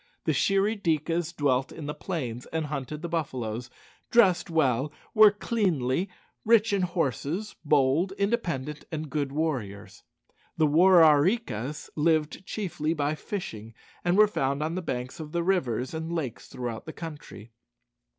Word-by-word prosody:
The - - +1
Shirry 200 +2 +1
dikas 165 0 0
dwelt 140 -5 0
in 155 - -8
the 150 - -3
plains, 130 -11 -5
and 160 -1 -2
hunted 150 +1 -5
the - - -2
buffaloes; 125 -8 -3 0.4
dressed 185 -8 +4
well; 140 -3 +1 0.2
were 215 -1 +8
cleanly; 185 - 0 0.3
rich 225 -1 +4
in 200 - +2
horses; 175 - -2
bold, 150 +4 +3
independent, 175 - -2
and 155 -2 -4
good 145 -3 -1
warriors. 130 -10 -3 0.6
The 160 - +4
War 170 +4 +6
are 150 -2 +6
ree 190 +10 +3
kas 145 - -6
lived 155 +3 +1
chiefly 165 -6 -2
by 145 0 0
fishing, 115 - -6 0.3
and 175 +2 +2
were 215 - +8
found 140 -6 -1
on 160 +1 -2
the 185 - -2
banks 125 -5 -4
of 155 0 -8
the 170 0 0
rivers 130 - 0
and 160 +1 -4
lakes 150 -9 -4
throughout 120 -1 -6
the 160 - -6
country. 145 - -9
155 Hz, 150 wpm, -27 LUFS, 135-180 Hz, 0.6 s, were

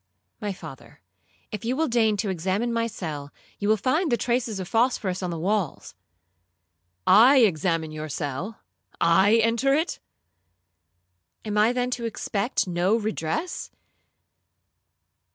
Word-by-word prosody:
'—'My 205 -1 -2
father, 155 -7 -12 0.5
if 210 - -5
you 240 +3 -1
will 320 +3 +1
deign 225 -3 +2
to 200 -1 -1
examine 190 +7 -1
my 230 0 0
cell, 155 -10 -6 0.3
you 205 - -1
will 220 - +4
find 300 - 0
the 240 - +3
traces 235 -4 -1
of 185 - -5
phosphorous 225 -5 0
on 180 - -2
the 170 - -4
walls.'—'I 90 - 0
examine 165 -5 +1
your 155 0 -6
cell? 150 +9 -4 0.4
I 190 +6 +4
enter 230 +4 +3
it?'—'Am 90 - -9
I 210 +2 +4
then 250 0 -1
to 240 -1 -3
expect 220 0 -1
no 180 +4 +1
redress? 215 - -3
190 Hz, 125 wpm, -25 LUFS, 140-230 Hz, 0.5 s, will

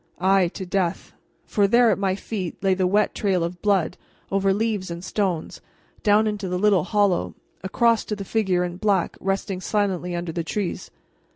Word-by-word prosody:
Ay, 190 0 +3
to 190 - -5
death; 185 -2 -2 0.3
for 205 -1 +2
there 235 +2 +5
at 195 - 0
my 190 -1 +1
feet, 195 -3 -5
lay 190 -1 +3
the 185 -1 +1
wet 205 +3 +2
trail 190 -4 0
of 170 +1 -5
blood, 190 -5 +1 0.3
over 195 0 +2
leaves 205 -2 -1
and 170 +2 -6
stones, 185 -6 -2 0.4
down 210 +1 +4
into 210 -3 -2
the 180 - -1
little 195 -3 +3
hollow, 200 -3 +1 0.3
across 230 +3 +2
to 210 - -4
the 200 -1 -7
figure 190 -4 +1
in 175 0 -4
black 195 -3 +1
resting 195 -1 -2
silently 185 -4 -1
under 175 -1 -3
the 170 +1 -3
trees. 185 +3 -3
195 Hz, 180 wpm, -23 LUFS, 180-205 Hz, 0.4 s, there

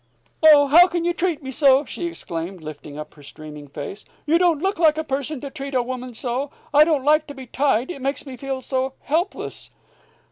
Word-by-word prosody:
"Oh, 300 -2 +8
how 335 +6 +7
can 345 -1 -2
you 345 - +1
treat 340 -4 -2
me 265 - -5
so!" 275 0 +4
she 345 - -5
exclaimed, 175 - -6
lifting 150 -1 -9
up 150 0 -8
her 150 - -17
streaming 150 +1 -11
face. 145 +8 -7 0.2
"You 320 +3 +3
don't 350 -3 +3
look 380 +1 -1
like 310 -2 +4
a 315 - -1
person 280 0 -3
to 280 - -7
treat 275 -2 -6
a 250 - +2
woman 250 -1 -6
so. 250 +4 -2 0.2
I 295 +1 +8
don't 300 -5 0
like 305 +1 +3
to 285 - -9
be 265 -1 -9
tied; 260 +2 0
it 275 - -8
makes 275 +3 -2
me 265 -2 -8
feel 265 +1 -5
so 260 0 -2
helpless." 335 +6 -3
275 Hz, 215 wpm, -22 LUFS, 245-310 Hz, 0.2 s, Oh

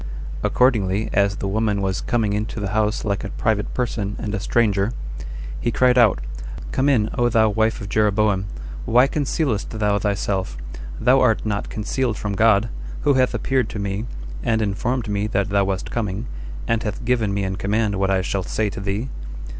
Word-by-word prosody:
Accordingly, 110 -5 +2
as 100 0 +3
the 100 - -3
woman 105 0 +1
was 95 -1 -1
coming 115 -4 0
into 105 +2 -2
the 100 -2 -2
house 105 +1 0
like 100 -2 -1
a 100 - -4
private 105 -1 0
person 110 -5 -1
and 105 - -4
a 105 - -1
stranger, 105 +1 +2 0.7
he - - 0
cried 125 +1 +4
out, 110 - +5 0.5
"Come 135 +2 +2
in, 110 -6 +2
O 120 0 +4
thou 110 -2 +4
wife 110 +2 +1
of 100 - -5
Jeroboam! 105 -1 +2 0.4
Why 125 +2 +5
concealest 140 -6 -1
thou 105 -2 +1
thyself? 100 - -1 0.4
Thou 130 +2 +5
art 115 -4 +3
not 105 -1 -2
concealed 110 +1 -1
from 105 -1 -3
God, 110 +1 +4 0.3
who 145 - +4
hath 130 -2 +2
appeared 130 0 +1
to - - -5
me, 100 +3 -2 0.3
and 115 -2 +1
informed 115 +4 -1
me 105 0 0
that 100 -1 0
thou 100 -1 +3
wast 95 0 -2
coming, 105 -1 -2 0.4
and 115 -1 +1
hath 105 +1 -4
given 115 -4 +2
me 100 0 0
in 95 0 -1
command 105 +1 +1
what 95 0 +1
I 95 -1 +2
shall 95 0 -1
say 105 +3 -1
to 115 - -6
thee." 100 +6 -2
105 Hz, 185 wpm, -22 LUFS, 100-115 Hz, 0.7 s, out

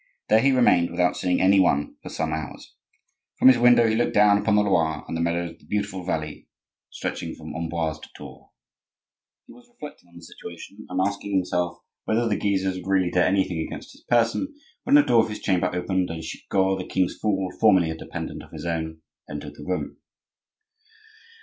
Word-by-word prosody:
There 110 - +6
he 135 +4 +3
remained, 120 -9 +4
without 90 +1 +1
seeing 90 -1 0
any 95 +1 +5
one, 75 -6 +2
for - - -9
some 80 -1 -2
hours. 80 -3 -7 0.6
From - - +7
his 125 -2 +5
window 120 -1 +6
he 110 - +1
looked 120 +1 0
down 105 0 +5
upon 105 0 +1
the 105 - +4
Loire 80 -6 0
and - - -4
the 80 - -2
meadows 85 0 -1
of - - -18
the - - -22
beautiful 100 -2 -3
valley 75 -4 -4 0.4
stretching - - -5
from - - -9
Amboise 80 -1 -3
to - - -13
Tours. - - -12 1.0
He - - -15
was 245 0 -18
reflecting 150 - -12
on 85 - -22
the 85 - -12
situation, 85 +5 -11
and 90 0 -2
asking 100 0 -4
himself 90 -2 -1 0.3
whether 115 +2 +1
the 105 - +1
Guises 95 -2 0
would 95 - -9
really 95 -2 +2
dare 90 - +3
anything 95 -3 0
against 80 - -6
his - - -18
person, 120 - +1 0.3
when 275 - +4
the 295 - +8
door 115 - +4
of - - -4
his 105 - -6
chamber 95 -2 +1
opened 90 +1 -1
and 80 0 -6
Chicot, 95 +3 -1
the 90 - -6
king's 95 -1 0
fool, 95 -3 0
formerly 95 -7 +4
a - - -5
dependent - - -7
of - - -15
his - - -7
own, 80 -1 -3 0.3
entered 75 0 -7
the 75 - -12
room. 90 +2 -3
95 Hz, 200 wpm, -24 LUFS, 85-105 Hz, 1.0 s, the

